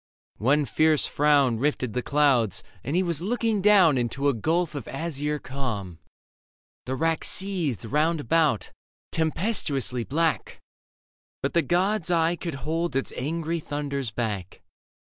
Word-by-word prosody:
One 140 +6 +3
fierce 155 +4 +2
frown 140 -5 +3
Rifted 130 -4 -1
the 125 - -1
clouds, 125 -10 +2 0.2
and 140 +6 -2
he 185 - +3
was 170 -3 +1
looking 225 +1 0
down 185 -9 +5
Into 135 +4 0
a - - +2
gulf 160 - 0
of 140 -6 -6
azure 150 0 -3
calm; 110 - -5 0.9
the 130 - -1
rack 165 +3 0
Seethed 180 - -2
round 155 +6 +1
about, 145 - +1 0.4
tempestuously 155 - 0
black; 160 +5 -1 0.8
But 140 - -1
the 170 - +4
god's 180 +2 0
eye 170 0 +2
could 170 -3 -5
hold 165 -1 -1
its 135 - -1
angry 165 +4 -2
thunders 140 -4 -3
back. 105 -5 -4
150 Hz, 135 wpm, -26 LUFS, 130-170 Hz, 0.9 s, down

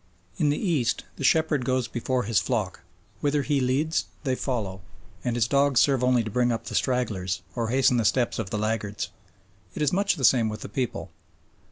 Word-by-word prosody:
In 155 -6 +2
the 145 - +1
East 155 - 0
the - - -5
shepherd 155 -2 +3
goes 130 -1 0
before 125 +2 -1
his 115 -2 +2
flock; 110 -7 -2 0.4
whither 145 0 +1
he 145 0 +1
leads 145 +6 +1 0.2
they 130 -3 0
follow, 110 -8 -3 0.4
and 120 -1 -1
his 115 -2 +2
dogs 140 0 +3
serve 135 -3 +3
only 125 -2 +3
to 110 - -5
bring 120 +2 +2
up 115 - -3
the - - -6
stragglers 100 -8 -1
or 115 -2 -1
hasten 130 0 +3
the 115 - +2
steps 120 +3 +1
of 105 -4 -3
the 105 - -2
laggards. 105 -5 -2 0.7
It - - -1
is 145 - +1
much 200 +1 +2
the 135 -6 0
same 115 -4 +4
with 105 0 -6
the - - -7
people. 125 +3 -3
125 Hz, 200 wpm, -26 LUFS, 110-140 Hz, 0.7 s, same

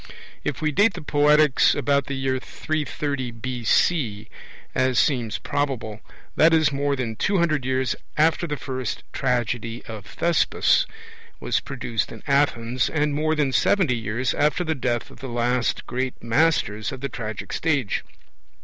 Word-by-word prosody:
If 150 +2 -3
we 155 - +2
date 205 +7 +3
the 175 - -7
Poetics 150 -1 +4
about 140 -1 +1
the 140 - -3
year 130 -1 -1
330 145 -3 -3
B.C., 120 -1 0 0.4
as 130 -1 +1
seems 120 -6 +1
probable, 130 -7 -2 0.4
that 165 +1 +5
is 155 -2 +3
more 140 0 0
than 120 -4 -3
two 200 - +1
hundred 155 -6 +1
years 130 -1 0 0.2
after 160 +3 +3
the 150 -2 -3
first 130 -1 -4
tragedy 120 -2 -1
of 105 -3 -8
Thespis 170 0 +2 0.5
was - - 0
produced 120 -4 -3
in - - -10
Athens, 130 -4 +1
and 150 -1 0
more 155 +2 +1
than 145 -3 +1
seventy 130 - +2 0.3
after 150 +4 +2
the 160 -2 0
death 120 -4 -2
of - - -15
the 135 -1 -6
last 120 +1 0
great 130 0 -3
masters 115 -4 +1
of 130 -2 -8
the 140 - -1
tragic 110 -4 -6
stage. 145 -10 0
135 Hz, 150 wpm, -24 LUFS, 120-150 Hz, 0.5 s, that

